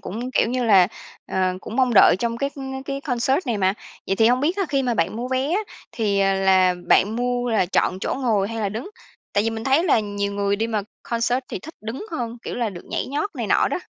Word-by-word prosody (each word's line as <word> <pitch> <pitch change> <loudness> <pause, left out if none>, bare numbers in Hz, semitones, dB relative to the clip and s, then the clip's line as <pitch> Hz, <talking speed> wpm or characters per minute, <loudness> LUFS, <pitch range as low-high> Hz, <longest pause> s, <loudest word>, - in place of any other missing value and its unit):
cũng, 235 +7 -5
kiểu - - +2
như 250 0 -1
là, 195 -5 +6 0.4
ờ, 185 -1 0
cũng 220 - -7
mong 255 -3 +2
đợi 195 - +7
trong 235 +1 -1
cái 275 +2 -1 0.3
cái 275 0 -4
concert 265 -1 +1
này 225 -4 -1
mà. 190 +1 +2 0.3
Vậy 195 - 0
thì 220 - +4
hông 250 +2 +3
biết 335 +7 +1
á, 395 - +1
khi 275 -1 +1
mà 245 -2 0
bạn 170 +1 0
mua 245 +2 -4
vé 260 +2 0
á, 400 - +2 0.3
thì, 205 -3 0
à, 195 0 +3
là 190 -1 +4
bạn 215 +3 +4
mua 245 0 -1
là 215 -5 +2
chọn 185 0 +1
chỗ - - -2
ngồi 220 -7 +1
hay 230 - -5
là 205 - 0
đứng? 230 - -6 0.4
Tại 205 - +2
vì 225 - +1
mình 225 0 -5
thấy 275 +6 +3
là 290 - +4
nhiều 205 -1 -3
người 200 0 0
đi 225 - -1
mà 220 -3 -1 0.2
concert 235 +1 0
thì - - -4
thích 320 +3 -11
đứng 230 - -6
hơn, 240 -6 -4
kiểu - - -5
là, 235 -3 -1
được 175 -2 -10
nhảy - - -3
nhót 300 +9 -2
này - - -3
nọ - - +3
đó. - - -2
230 Hz, 255 wpm, -22 LUFS, 200-255 Hz, 0.4 s, đợi